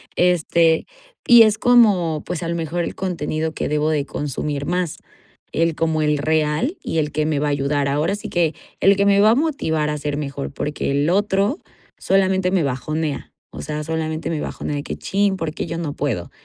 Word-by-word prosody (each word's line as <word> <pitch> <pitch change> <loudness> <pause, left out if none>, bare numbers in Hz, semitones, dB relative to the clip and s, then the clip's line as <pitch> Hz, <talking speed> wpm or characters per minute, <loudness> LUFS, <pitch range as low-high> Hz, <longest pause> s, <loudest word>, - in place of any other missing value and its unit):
este, 170 -2 +3 0.4
y 240 -1 +9
es 215 -1 +2
como, 195 -11 +4
pues, 180 -1 -4
a - - -3
lo 170 - -2
mejor 170 +1 -2
el - - -6
contenido 160 -3 -2
que - - -3
debo 150 +1 +1
de 145 -2 0
consumir 145 0 -3
más, 175 -2 -1 0.6
el 165 -1 +1
como 160 -1 0
el 150 -1 +2
real 155 - 0
y 165 - -2
el 150 -1 -1
que 155 0 -1
me 155 -2 0
va 150 - 0
a - - +1
ayudar. 140 0 0
Ahora 150 +7 0
sí 205 - -7
que, 170 -3 +1 0.3
el 195 +1 +5
que 200 +1 +2
me 200 0 +4
va 215 +2 +6
a - - +4
motivar 160 - 0
a 150 - -2
ser 145 0 -3
mejor, 140 - -4
porque 150 -1 -3
el 145 +3 +1
otro 200 - +1 0.4
solamente 190 -1 +1
me 185 -4 +2
bajonea, 150 +3 -3 0.2
o - - -8
sea, 150 0 -4
solamente 160 0 -3
me 160 -2 -2
bajonea, 145 - -4
de 145 - -4
que: - - -5
Cchín, 200 0 0
¿por 160 -3 -3
qué - - -4
yo 165 - -4
no 155 -4 -3
puedo?". 115 -12 -3
160 Hz, 210 wpm, -21 LUFS, 150-185 Hz, 0.6 s, y